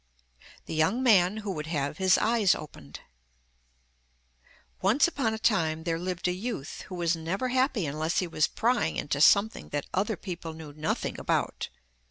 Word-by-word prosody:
THE - - -6
YOUNG 160 +11 +1
MAN 200 -4 +4
WHO 210 -2 -4
WOULD 155 -4 -5
HAVE 145 -2 -2
HIS 190 -1 +5
EYES 220 -4 +3
OPENED 75 - -10 1.8
Once 220 - +4
upon 245 -9 -1
a - - -5
time 160 -8 +1
there 165 -1 -1
lived 180 0 -2
a - - +2
youth 185 - -5
who 185 - -7
was 170 -1 +1
never 175 +10 -2
happy 255 - +1
unless 155 +3 -2
he 185 - +2
was 160 -3 +1
prying 240 +2 0
into 140 -1 -1
something 200 +6 +4
that 145 -1 -3
other 205 +2 0
people 170 -3 -6
knew 160 -2 -10
nothing 155 +1 -3
about. - - -1
180 Hz, 165 wpm, -28 LUFS, 160-220 Hz, 1.8 s, HIS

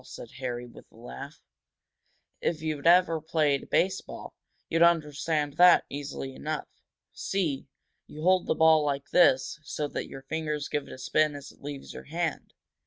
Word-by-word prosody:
said 125 -2 -10
Harry, 125 -2 -4
with 120 - -15
a - - -22
laugh. 140 +5 -10 1.0
"If 160 -2 -1
you'd 155 -1 -2
ever 170 -2 +5
played 150 -3 0
baseball, 190 +1 -1 0.3
you'd 165 - 0
understand 155 -3 +2
that 180 0 +7
easily 140 -1 -5
enough. 155 +3 -4 0.5
See? 160 -9 -2 0.4
You 155 +1 -9
hold 185 0 +3
the - - +1
ball 160 -1 +5
like 140 -1 -2
this 135 -5 +4
so 150 -1 -3
that - - -4
your 135 - -9
fingers 150 -1 -3
give 145 -1 -2
it - - -11
a - - -8
spin 150 +3 +1
as 140 -1 -9
it - - -24
leaves 140 -1 -7
your - - -9
hand." 165 0 -3
150 Hz, 165 wpm, -28 LUFS, 140-165 Hz, 1.0 s, that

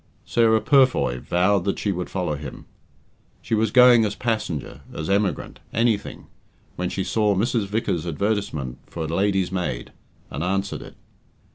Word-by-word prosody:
Sarah 110 -2 +3
Purfoy 130 - +3
vowed 90 +7 +2
that 100 - 0
she 100 - -1
would 90 -1 -4
follow 90 -5 -2
him. 70 -2 -8 0.8
She - - -4
was 110 0 +2
going 125 0 +7
as 105 -1 -1
passenger, 110 - -3
as 80 +4 -4
emigrant, 100 -1 -1
anything, 115 -3 0 0.5
when 90 0 -2
she 95 - -2
saw 105 -1 +1
Mrs. 115 +1 0
Vickers's 95 -5 -1
advertisement 80 - -2
for 85 - -5
a - - -3
"lady's 95 +2 +1
maid," 75 -11 -3 0.4
and 70 +4 -3
answered 95 +2 -1
it. - - -11
100 Hz, 150 wpm, -23 LUFS, 85-110 Hz, 0.8 s, going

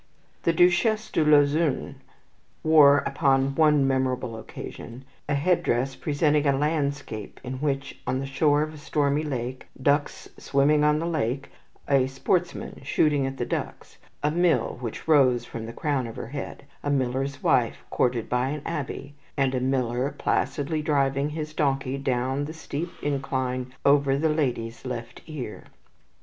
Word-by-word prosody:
The 170 - +2
Duchesse 180 +6 +3
de 160 - +2
Lauzun 150 0 +3 0.7
wore 145 -3 +6
upon 135 -1 +2
one 150 -2 +4
memorable 130 -3 0
occasion 115 +2 -9 0.2
a 145 - +2
head 170 +5 +2
dress 130 +3 0
presenting 150 -1 +1
a 140 -1 +3
landscape 140 -7 -2
in 130 0 -5
high 150 - -1
relief 140 0 -2
on 130 - +1
the 135 - -3
shore 145 +2 +2
of 155 0 -5
a 155 - -11
stormy 145 -1 +1
lake, 130 -4 -4
ducks 145 +2 0
swimming 145 +2 +3
on 150 0 +4
the 165 - -2
lake, 140 -5 -2 0.4
a 135 -2 +3
sportsman 170 +7 -2
shooting 140 0 +2
at 135 0 -5
the 120 - -2
ducks, - - -5 0.2
a 150 - +2
mill 165 -9 +1
which 120 +3 -6
rose 130 -6 +4
from 115 -1 -7
the - - -6
crown 140 -1 -1
of 115 - -8
her 115 - -6
head, 140 0 -6 0.2
a 145 - -2
miller's 135 0 -1
wife - - +2
courted 120 -2 +1
by 125 +1 0
an 150 0 -4
abbe, 145 -3 -4 0.2
and 135 -1 +2
a 130 - +1
miller 130 0 0
placidly 155 +2 0
driving 140 -1 +1
his 155 0 -5
donkey 135 -3 0
down 130 +1 -1
the 155 - -6
steep 160 +1 -5
incline 130 -3 -2
over 140 -1 +4
the 160 +2 +1
lady's 125 -7 -1
left 125 -2 -6
ear. 140 -9 -7
140 Hz, 160 wpm, -26 LUFS, 130-150 Hz, 0.7 s, wore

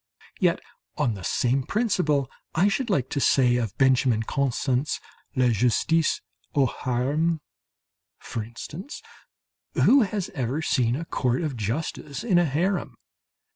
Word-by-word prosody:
Yet - - +3 0.4
on 120 - +1
the 95 -3 -8
same 125 +8 +1
principle 150 - +1 0.3
I 185 +5 +4
should 235 +5 -1
like 140 - +1
to 140 - 0
say 125 -3 +4
of 115 -6 -3
Benjamin 130 -4 +3
Constant's 135 +2 0 0.4
"La 130 -2 +3
Justice 125 +8 +2 0.3
au 140 -2 +4
Harem," 140 +7 0 0.8
for 115 - -5
instance, 150 - -8 0.7
who 275 +1 +6
has 205 -3 -2
ever 130 +3 -2
seen 125 -5 +2
a 165 +4 -4
court 130 -1 0
of 150 -5 -2
justice 135 +6 -3
in 190 -7 +3
a 175 - +3
harem? 160 -2 -1
140 Hz, 135 wpm, -25 LUFS, 125-165 Hz, 0.8 s, who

